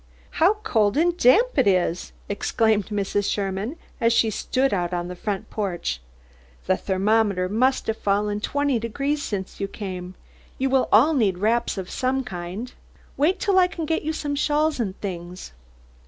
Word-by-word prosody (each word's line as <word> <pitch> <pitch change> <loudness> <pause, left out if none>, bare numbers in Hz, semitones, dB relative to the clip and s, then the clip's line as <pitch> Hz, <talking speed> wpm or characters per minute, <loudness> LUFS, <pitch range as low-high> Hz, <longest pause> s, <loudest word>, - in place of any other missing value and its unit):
"How 375 +6 +6
cold 220 - +2
and 345 +2 +3
damp 370 - +4
it 255 - +4
is!" 180 -2 +1 0.2
exclaimed 210 0 +1
Mrs. 205 -1 -1
Sherman, 200 - -2 0.2
as 230 -2 +3
she 225 -1 +3
stepped 260 +5 0
out 175 -2 -1
on 175 0 -3
the 180 - -6
front 195 +1 -4
porch. 175 - -3 0.6
"The - - +3
thermometer 195 -1 +1
must 255 +7 +1
have 220 0 -2
fallen 205 +1 0
twenty 285 0 0
degrees 275 +6 -2
since 200 -7 -5
you 195 - -1
came. 185 -3 -7 0.4
You 265 0 0
will 265 -1 +2
all 260 +10 +6
need 210 -10 +2
wraps 225 +3 +1
of 185 -1 -5
some 260 +1 0
kind. 190 +3 -6 0.4
Wait 325 +8 +2
till 390 -3 +3
I 360 - +5
can 335 -3 -5
get 320 +1 0
you 315 - -2
some 295 -2 -3
shawls 295 +1 +1
and 200 -5 -3
things." 180 - -6
220 Hz, 170 wpm, -24 LUFS, 195-275 Hz, 0.6 s, How